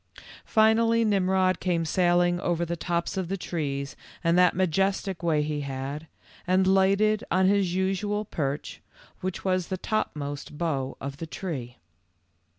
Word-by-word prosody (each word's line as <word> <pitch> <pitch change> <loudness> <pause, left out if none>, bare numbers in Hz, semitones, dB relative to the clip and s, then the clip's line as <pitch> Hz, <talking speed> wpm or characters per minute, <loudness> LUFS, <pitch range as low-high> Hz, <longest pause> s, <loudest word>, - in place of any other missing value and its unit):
Finally 225 +1 +4
Nimrod 190 -2 +2
came 170 -3 0
sailing 175 +1 +2
over 170 -1 0
the 170 +1 -3
tops 170 +1 -2
of 185 -2 -1
the 195 +3 -2
trees 140 -6 -3 0.3
in 170 0 +3
that 180 -1 +5
majestic 190 +1 0
way 160 -3 +2
he 150 -1 -2
had, 140 +3 -5 0.4
and 185 +1 +3
lighted 195 +3 +3
on 190 0 +3
his 190 -2 +2
usual 195 +3 0
perch, 145 -6 -4 0.4
which 185 +1 -4
was 185 -2 +1
the 190 - -3
top 215 +3 -1
most 145 0 -6
bough 140 -5 -2
of 140 0 -6
the 165 - -6
tree. 135 -9 -5
180 Hz, 150 wpm, -27 LUFS, 155-190 Hz, 0.4 s, that